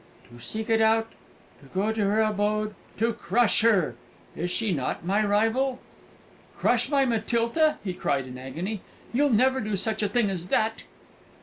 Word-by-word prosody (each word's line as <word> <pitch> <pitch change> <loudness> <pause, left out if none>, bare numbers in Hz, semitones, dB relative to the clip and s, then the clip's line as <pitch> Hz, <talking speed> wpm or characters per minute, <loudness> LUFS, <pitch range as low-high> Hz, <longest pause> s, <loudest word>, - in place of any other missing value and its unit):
"To 120 - -12
seek 220 0 -4
it 225 0 +4
out, 225 0 +3 0.5
to - - -17
go 205 +3 +1
to 220 -1 -2
her 215 +2 +3
abode, 215 0 0 0.2
to 230 +2 +1
crush 235 0 +2
her! 215 -8 +3 0.4
Is 175 +2 -2
she 220 +3 -1
not 145 0 -2
my 200 +4 +2
rival?" 225 +6 +1 0.8
"Crush 245 +1 +1
my 280 -2 +3
Matilda?" 235 +6 +1
he 190 -3 -3
cried 140 -6 -1
in 130 -1 -9
agony. 165 +11 -5 0.3
"You'll 285 +4 +3
never 260 +3 +3
do 215 -1 -2
such 220 +4 -1
a 210 - +1
thing 210 -1 +1
as 180 -2 -4
that?" 220 +4 0
220 Hz, 170 wpm, -26 LUFS, 195-230 Hz, 0.8 s, it